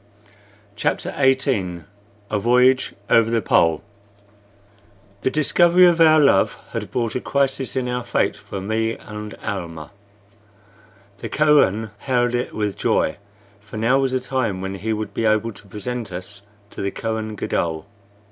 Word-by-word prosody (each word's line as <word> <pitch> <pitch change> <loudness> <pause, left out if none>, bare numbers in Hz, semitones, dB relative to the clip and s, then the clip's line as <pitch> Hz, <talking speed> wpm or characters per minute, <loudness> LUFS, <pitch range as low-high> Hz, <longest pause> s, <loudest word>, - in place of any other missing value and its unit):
CHAPTER 105 - -1
XVIII 130 - +1 0.5
A 105 - +1
VOYAGE 125 +3 +3
OVER 115 -1 +4
THE 115 -1 +1
POLE 80 -3 +2 1.4
The - - +1
discovery 175 +5 +4
of 170 -1 +4
our 155 -1 +7
love 140 -10 +3
had - - -4
brought 115 -3 -2
a 125 - -2
crisis 135 -1 -1
in 130 -1 -1
our 125 0 -2
fate 120 - 0
for 100 - -8
me 110 +3 -1
and 105 0 -8
Almah. 85 -7 -5 1.3
The - - -6
Kohen 125 -8 +3
hailed 125 -2 0
it 120 0 -1
with 105 -2 -2
joy, 80 - +1 0.4
for 105 +1 -10
now 115 +5 +3
was 135 -1 0
the 130 - +1
time 125 -7 -2
when 95 +1 -4
he 100 +4 -3
would 110 -1 -3
be 115 - -1
able 110 +1 +2
to 100 -1 -15
present 110 +2 -5
us 95 +3 -7 0.3
to - - -7
the 100 - -1
Kohen 110 0 -4
Gadol. 80 -4 -2
115 Hz, 150 wpm, -21 LUFS, 100-130 Hz, 1.4 s, our